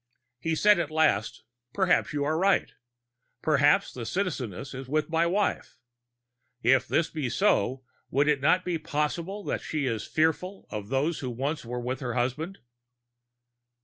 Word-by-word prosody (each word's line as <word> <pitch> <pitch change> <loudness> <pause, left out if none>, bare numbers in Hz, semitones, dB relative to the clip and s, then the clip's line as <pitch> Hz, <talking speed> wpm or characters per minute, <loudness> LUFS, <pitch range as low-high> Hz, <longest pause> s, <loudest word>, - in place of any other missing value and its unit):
He 165 +5 -1
said 210 +3 +5
at 165 -3 -1
last: 155 -9 +1 0.3
"Perhaps 190 -6 +2
you 145 -1 -1
are 155 +2 0
right. 190 +4 +2 0.7
Perhaps 150 +5 +3
the 125 - -6
Citizeness 135 - -3
is 130 0 -7
with 155 +2 0
my 165 +1 +3
wife. 200 -6 -1 0.9
If 135 -1 +4
this 160 - +1
be 150 -6 -2
so, 130 - +1 0.3
would 140 +3 +2
it 150 -2 +2
not 180 +6 +3
be 175 -2 -1
possible 165 +7 -2
that - - -2
she 150 -3 -2
is 115 -4 -2
fearful 160 +5 0
of 105 -1 -5
those 145 +5 0
who 130 -4 -4
once 135 +6 -3
were 125 +1 -4
with 125 +2 -3
her 125 -4 -3
husband?" 150 +10 -2
150 Hz, 155 wpm, -27 LUFS, 130-170 Hz, 0.9 s, said